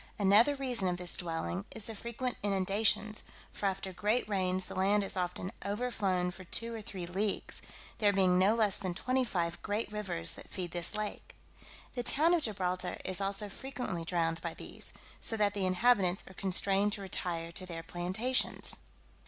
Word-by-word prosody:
Another 210 +8 +5
reason 250 -8 +2
of 180 -1 0
this 180 -1 +1
dwelling, 175 +2 -3
is 220 - 0
the 225 - -4
frequent 235 +3 -3
inundations; 205 +2 +1 0.3
for 200 - -1
after 190 0 -2
great 210 +6 +1
rains, 185 -2 +2
the - - -6
land 200 +2 +3
is 195 - -2
often 180 0 -2
overflown 200 -4 0
for 185 +1 -11
two 230 +6 -1
or 225 - -5
three 190 -4 -6
leagues, 195 +4 -1 0.4
there 205 -2 +5
being 185 -2 +4
no 200 +4 +5
less 210 -3 +4
than 185 -3 -3
twenty 255 +6 +1
five 175 -7 -2
great 210 +2 -2
rivers 190 - -1
that - - -8
feed 180 -2 -4
this 175 +4 0
lake. 215 -1 -4 0.6
The 245 - -2
town 310 +7 +4
of 345 - +3
Gibraltar 185 -6 -1
is 185 +1 -2
also 195 +1 0
frequently 245 -6 -5
drowned 165 -1 0
by 170 -1 -4
these, - - -5 0.3
so 225 - +4
that 205 -1 +2
the 195 -2 0
inhabitants 185 -1 +3
are 190 - -11
constrained 195 +2 +2
to 205 - -2
retire 170 -3 -3
to 185 +2 -2
their 165 -2 -5
plantations. 185 +10 +1
195 Hz, 175 wpm, -32 LUFS, 180-215 Hz, 0.6 s, Another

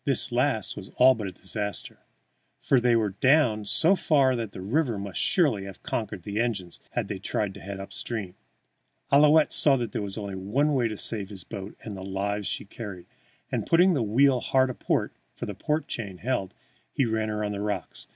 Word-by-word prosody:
This - - +3
last - - 0
was - - -8
all 130 +1 +7
but 110 -5 -5
a - - -5
disaster, 105 +2 -4 0.6
for 135 - +3
they 120 -1 +3
were 110 -3 +1
down 115 0 +3
so 165 - +4
far 140 -7 +3
that 115 -4 -4
the - - -9
river 120 +4 0
must 100 -2 -5
surely 135 - +2
have 95 -3 -10
conquered 105 -5 -3
the 105 +3 -1
engines 100 -7 -3
had - - -1
they - - -5
tried 105 -3 -2
to 100 - -11
head 95 +1 -7
up 95 - -8
stream. 105 -7 -4 0.8
Ouillette 150 +2 +6
saw 140 -2 +5
there 120 -3 -3
was 100 0 -4
only 100 -2 -5
one 125 +11 0
way 125 -4 +2
to 110 -2 -5
save 100 -3 +1
his 95 -4 -6
boat 100 +1 -8
and 105 -3 -6
the 95 - -8
lives 100 +1 -2
she - - -2
carried, 100 -4 -8 0.5
and, - - -2
putting 180 +3 +5
the 140 - +1
wheel 125 +5 +3
hard 130 0 +2
aport, - - -1 0.2
for - - -5
the 105 - -5
port 150 +11 -2
chain 100 -5 -4
held, 110 -3 -2 0.4
he 135 - +1
ran 110 -1 -1
her 105 0 -2
on 105 - -2
the 100 -1 -4
rocks. 105 0 -4
110 Hz, 205 wpm, -26 LUFS, 100-130 Hz, 0.8 s, all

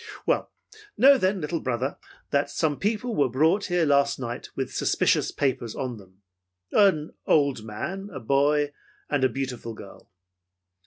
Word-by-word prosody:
Well, - - 0 0.5
know 275 +2 +8
then, 190 -1 +1
little 160 +2 -2
brother, 130 +1 -2 0.3
that 140 0 +1
some 150 -3 -1
people 220 +3 -1
were 140 -3 +2
brought 160 - +2
here 175 -3 +1
last 140 -1 +3
night 120 -1 -6
with 135 -1 -3
suspicious - - +2
papers 125 -5 -2
on 125 -3 -4
them. 95 0 -18 0.5
An 185 -7 +3
old 140 -7 +2
man, 175 - -5
a 130 - -6
boy 145 +4 +2 0.4
and 145 -2 +1
a 130 - +4
beautiful 125 -4 -5
girl. 100 -2 -13
140 Hz, 150 wpm, -26 LUFS, 125-170 Hz, 0.5 s, know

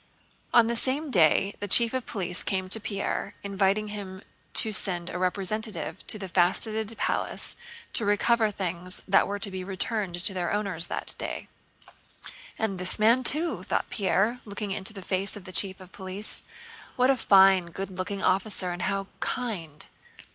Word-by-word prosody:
On 235 -1 +6
the 235 +1 -1
same 275 +5 +1
day 185 +1 +4
the 205 - -4
Chief 230 +4 +5
of 260 -2 -3
Police 180 -4 0
came 190 -2 -1
to 220 - -1
Pierre, 200 -2 -3
inviting 200 +1 +1
him 195 -2 -7 0.3
to 220 - +6
send 180 -4 0
a 180 - -4
representative 200 +4 -2
to - - -1
the 195 -2 -6
Faceted 215 +5 0
Palace - - -1 0.4
to - - +5
recover 220 +2 +3
things 180 -2 -4
that 195 - +4
were 205 - -2
to 200 0 -3
be 185 -1 -5
returned 195 0 -2
to 190 +2 0
their 175 -2 -2
owners 195 -5 -1
that - - -2
day. - - -5 1.1
"And 200 -4 -2
this 180 0 0
man 230 +4 +4
too," 315 +7 +3
thought - - -2
Pierre, 200 +5 +1
looking 205 -1 -5
into 190 +2 -2
the 195 -3 -9
face 195 +2 0
of 200 - -11
the 185 - -9
Chief 190 0 +1
of 185 -1 -13
Police. 190 +2 -6 0.5
"What 255 +1 +4
a - - +2
fine, 190 -5 +5
good 195 +3 -6
looking 190 +2 -4
officer 190 -1 0
and 175 0 -5
how 195 +1 -1
kind. 175 -12 -4
195 Hz, 170 wpm, -27 LUFS, 185-215 Hz, 1.1 s, On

